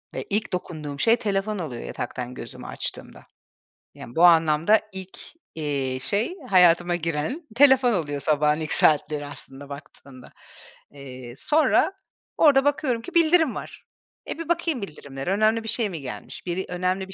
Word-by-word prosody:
ve - - -3
ilk 210 -1 -1
dokunduğum 150 -5 -5
şey 230 +7 +4
telefon 205 -1 -2
oluyor 130 -8 -5
yataktan 125 -1 -5
gözümü - - -9
açtığımda. - - -5 0.7
Yani, 120 - -11
bu 165 - +3
anlamda 165 +4 +5
ilk, 190 0 -8 0.4
eee, 140 -4 -2
şey 215 - -1 0.2
hayatıma 175 -1 +5
giren 165 - -3
telefon 265 -2 +6
oluyor 145 -6 -2
sabahın 150 0 +2
ilk 155 0 0
saatleri 150 -1 +3
aslında 145 0 -9
baktığında. 140 -2 -12 0.6
Eee, 130 -3 -10
sonra 310 - +2 0.4
orada 285 -3 +5
bakıyorum 270 -5 0
ki 355 +8 -10
bildirim 325 -3 +4
var. - - -9 0.5
E, - - -5
bir 330 0 -6
bakayım 330 -7 0
bildirimlere. 145 -3 -6
Önemli 215 +2 +2
bir - - -8
şey 225 -2 0
mi 165 -5 -6
gelmiş? 130 -2 -8
Biri, 185 +1 -3
önemli 185 +1 -1
bir 190 - -10
180 Hz, 150 wpm, -24 LUFS, 145-230 Hz, 0.7 s, telefon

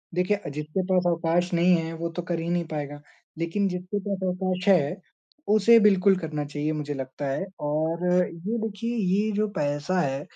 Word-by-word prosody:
देखिए 180 -3 0
जिसके 150 +5 -2
पास 180 -1 +3
अवकाश 175 +1 +1
नहीं 175 +1 +5
है 165 0 -2
वो 170 0 -3
तो - - 0
कर 170 -1 -3
ही 165 +1 -3
नहीं 175 -1 0
पाएगा, 145 -2 -5 0.4
लेकिन 180 +5 0
जिसके 180 +3 -3
पास 200 -1 -1
अवकाश 185 +1 -2
है 160 -7 +4 0.6
उसे 230 +2 +7
बिल्कुल 195 -2 +5
करना 155 -4 -3
चाहिए, 145 +1 -2
मुझे 145 -1 -3
लगता 135 +1 -5
है। 165 +8 -2
और 160 +4 -1
ये 180 +5 0
देखिए 230 +3 -4
ये 205 +1 +1
जो 215 +1 +1
पैसा 145 +5 0
है 135 -3 -1
175 Hz, 180 wpm, -26 LUFS, 150-190 Hz, 0.6 s, उसे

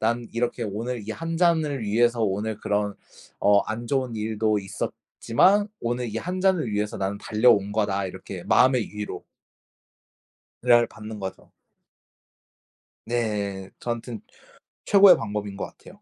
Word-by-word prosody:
난 115 +1 0
이렇게 120 0 -1
오늘 115 +3 -4
이 - - -2
1 165 +4 -4
잔을 160 -7 +2
위해서 115 +2 +2
오늘 105 +2 -2
그런 105 -1 -1 0.5
어 100 0 +5
안 115 +2 -4
좋은 130 -4 -1
일도 110 0 0
있었지만 185 - +1
오늘 120 +1 -2
이 115 - 0
1 180 +5 -4
잔을 185 -9 +2
위해서 105 0 -1
나는 100 +1 -2
달려온 105 -2 +3
거다.' 100 -2 0
이렇게 95 -1 -8
마음의 125 -3 +3
위로 105 0 -6 1.4
를 120 -1 +5
받는 110 0 -9
거죠. 95 -1 -7 1.5
네 105 -5 -2
저한테는 120 -1 -4 0.6
최고의 200 -1 +8
방법인 105 -2 -4
것 100 - -4
같아요. 205 +3 -16
110 Hz, 260 characters per minute, -25 LUFS, 105-125 Hz, 1.5 s, 최고의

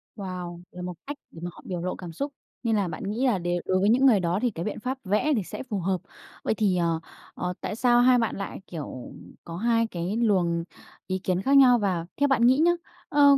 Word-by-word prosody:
Wow! 180 -3 -6
Là 180 - -8
một 180 0 -4
cách 290 0 -4
để 165 - -11
mà 175 - -2
họ - - -14
biểu 180 -2 -3
lộ 180 +1 -2
cảm 175 -2 -8
xúc. 280 - -4 0.3
Nên 225 -2 +2
là 200 -3 +1
bạn 210 +6 -6
nghĩ 215 +7 -1
là 230 -6 +3
để 175 0 -1
đối 185 0 +2
với 200 +3 +3
những 255 +4 +4
người 235 -7 +6
đó 180 +2 0
thì 245 - +1
cái 170 -3 -5
biện 210 - -3
pháp 255 +4 -3
vẽ 210 +10 +1
thì 210 - 0
sẽ - - -6
phù 220 -6 -3
hợp. 185 0 0 0.4
Vậy - - +1
thì, 200 -4 +1
ờ, 165 -2 +1 0.4
ờ, 180 0 -2
tại - - -3
sao 240 +1 +4
hai 250 0 +6
bạn 230 -2 0
lại, 195 0 -5
kiểu, 145 -7 -7 0.3
có 165 0 -7
2 230 +2 +2
cái 185 +2 -3
luồng 180 -7 +2 0.4
ý 185 0 -1
kiến 185 -1 0
khác 275 +7 +4
nhau? 250 -3 +7
Và 185 -5 0
theo 285 - +3
bạn 270 -4 +2
nghĩ 260 +2 +5
nhá, 335 +3 +5 0.4
ờ, 285 -3 +6
200 Hz, 245 wpm, -26 LUFS, 180-245 Hz, 0.4 s, nhau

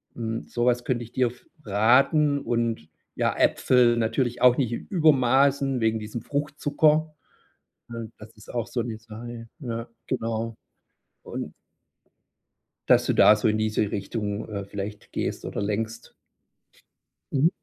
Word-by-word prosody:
Hm, 115 -1 -4
sowas 120 0 +1
könnt 120 -2 -1
ich 120 0 -9
dir 130 -2 +2
f 120 +1 -10 0.2
raten 135 +8 +4
und 115 -8 -1 0.3
ja, - - +1
Äpfel 120 -2 +3
natürlich 120 +2 0
auch 125 -1 +6
nicht 125 -4 0
in - - -4
Übermaßen 140 -4 +3
wegen 110 0 +1
diesem 110 +2 -6
Fruchtzucker. 150 +2 +1 0.8
Hm, 115 -1 -7
das 110 +1 -13
ist 105 - -13
auch 120 -2 -2
so 120 0 -2
'ne 115 -2 -5
Sache, 115 +1 -9
ja, 115 -3 -5 0.2
genau. 115 0 -2 0.7
Und - - -6 1.4
dass - - +5
du - - +2
da 105 - +7
so 105 +1 +1
in 110 - +1
diese 110 -1 0
Richtung, 105 +1 -3
äh, 100 -2 -4
vielleicht 100 +1 -7
gehst - - -3
oder - - -4
lenkst. 110 +2 -3 1.2
Mhm. 145 +4 +4
115 Hz, 140 wpm, -25 LUFS, 110-130 Hz, 1.4 s, da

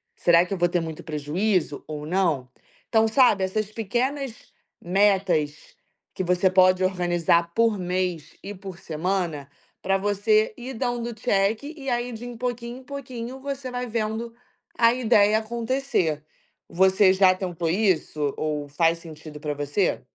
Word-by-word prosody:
"Será 170 0 +4
que 180 - -5
eu - - -2
vou 175 0 +3
ter 175 0 0
muito 160 -1 -6
prejuízo 160 +2 -1
ou 150 -1 -6
não?". 165 -7 0 0.4
Então, 225 -1 +4
sabe 220 -4 +4
essas 210 +2 -2
pequenas 245 +5 -2 0.5
metas 185 -5 +1 0.4
que 185 - -2
você 180 +1 +3
pode 185 0 +4
organizar 175 -2 +1
por 230 0 +2
mês 180 -3 -2
e 205 - -6
por 190 -2 -9
semana, 165 -3 -2 0.3
pra 195 0 +1
você 205 +2 +2
ir 255 +2 -7
dando 240 -1 -2
check, 215 0 0
e 285 -2 -6
aí, 240 0 -1
de 235 +2 -7
pouquinho 245 0 -4
em - - -15
pouquinho, 255 -2 -7
você 270 -1 -5
vai 250 0 -3
vendo 225 +1 -3 0.4
a 230 0 +5
ideia 220 -4 +4
acontecer. 230 - -1 0.5
Você 190 +2 +4
já 190 -1 +5
tentou 175 -3 -3
isso 160 -6 0
ou 150 -2 -2
faz 165 +3 +2
sentido 155 -2 -11
para 150 0 -3
você? 145 +6 -1
195 Hz, 145 wpm, -24 LUFS, 170-230 Hz, 0.5 s, a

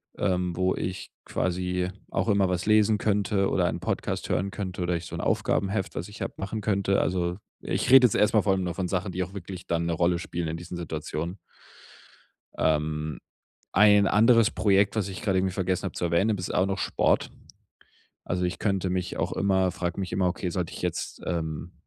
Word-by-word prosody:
Ähm, 90 -2 0
wo 95 0 +1
ich 95 +1 -5
quasi 90 0 -1 0.2
auch - - 0
immer 100 -2 +3
was 90 +1 -2
lesen 110 -1 +4
könnte 100 -1 +1
oder 90 - +1
einen 85 - -1
Podcast - - -3
hören 100 +1 0
könnte 95 -3 -4
oder 90 0 0
ich 85 0 -4
so - - -7
'n - - -4
Aufgabenheft, 95 -1 0
was 90 - -4
ich 105 0 -12
habe, - - -4
machen 105 +3 -4
könnte. 100 -1 +1
Also, 90 -1 -1 0.2
ich - - -1
rede 130 0 +9
jetzt 115 - +3
erstmal 105 0 +3
von 95 -2 +1
nur 90 -2 -3
von 90 -1 -2
Sachen, 95 +1 -2
die 90 +1 -1
auch 95 +1 -9
wirklich 95 -1 -8
dann 85 0 -1
'ne 85 - 0
Rolle 85 +1 +1
spielen 85 -1 -4
in 80 - -3
diesen 85 +1 -7
Situationen. 85 +2 -4 1.2
Ähm, 75 -1 0 0.5
ein 105 -1 +6
anderes 115 +2 +5
Projekt, 100 -1 +2
was 105 -3 -1
ich 95 - -7
gerade 95 -3 +1
irgendwie 95 -1 0
vergessen 95 -1 -1
habe 95 - -4
zu 90 - -2
erwähnen, 95 +6 +2
das 90 - -4
ist - - -4
auch 90 - +3
noch 95 0 -2
Sport. - - +1 0.9
Also, 90 0 -1
ich 90 - -2
könnte 95 -3 0
mich 90 0 -2
auch - - -1
immer 95 -2 +2
frage 90 +1 -3
mich 95 - -4
immer: 95 -1 +1
„Okay, 90 +1 -3
sollte 90 -1 -3
ich - - -8
jetzt - - -3
ähm, 80 -1 -3
95 Hz, 205 wpm, -27 LUFS, 85-100 Hz, 1.2 s, rede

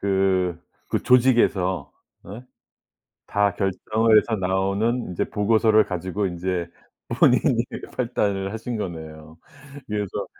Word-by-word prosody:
그 95 -3 +1 0.3
그 - - -1
조직에서 115 - +2 0.4
예 105 +6 -8 0.9
다 105 -1 +2
결정을 110 +3 +2
해서 110 +1 0
나오는 100 +5 -1
이제 85 - -2
보고서를 110 +1 +3
가지고 95 +2 -3
인제 90 -1 -3 0.4
본인이 - - +3 0.3
판단을 100 -6 -1
하신 115 +2 -4
거네요. 80 -4 -7 0.5
그래서 105 -2 -3
100 Hz, 235 characters per minute, -23 LUFS, 90-110 Hz, 0.9 s, 보고서를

